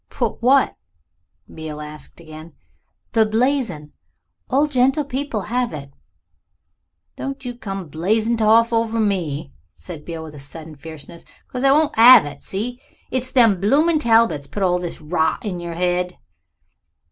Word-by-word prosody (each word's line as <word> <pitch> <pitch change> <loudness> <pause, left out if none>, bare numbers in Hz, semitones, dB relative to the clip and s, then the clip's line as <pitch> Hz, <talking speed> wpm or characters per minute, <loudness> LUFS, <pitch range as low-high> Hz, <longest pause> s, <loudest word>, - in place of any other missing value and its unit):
"Put - - -3
what?" 265 +3 +3 0.8
Beale 155 -1 -7
asked 150 +2 -10
again. 155 0 -12 0.6
"The 225 -2 +4
blazon. 225 - -1 0.6
All 280 +4 +3
gentlepeople 270 -2 0
have 245 -2 -1
it." 140 -2 -8 1.3
"Don't 270 -1 -6
you 245 - -4
come 195 -5 -6
the 165 - -15
blazing 215 +9 0
toff 225 +2 +4
over 230 0 0
me," 170 - -1 0.2
said 165 -5 -10
Beale 165 -1 -6
with 150 -3 -10
sudden 155 +2 -9
fierceness, 160 +3 -11 0.3
"'cause 250 0 -4
I 270 - +5
won't 300 +1 +3
'ave 240 -6 +9
it. - - -15
See? 240 +6 -5 0.3
It's 260 0 -2
them 225 -8 +4
bloomin' 305 +10 +3
Talbots 225 - +2
put 200 +7 -4
all 180 -1 +2
this 175 -1 -5
rot 160 +4 -1
into 180 -4 -4
your 170 -1 -5
head." 180 +1 -1
205 Hz, 145 wpm, -21 LUFS, 160-245 Hz, 1.3 s, ave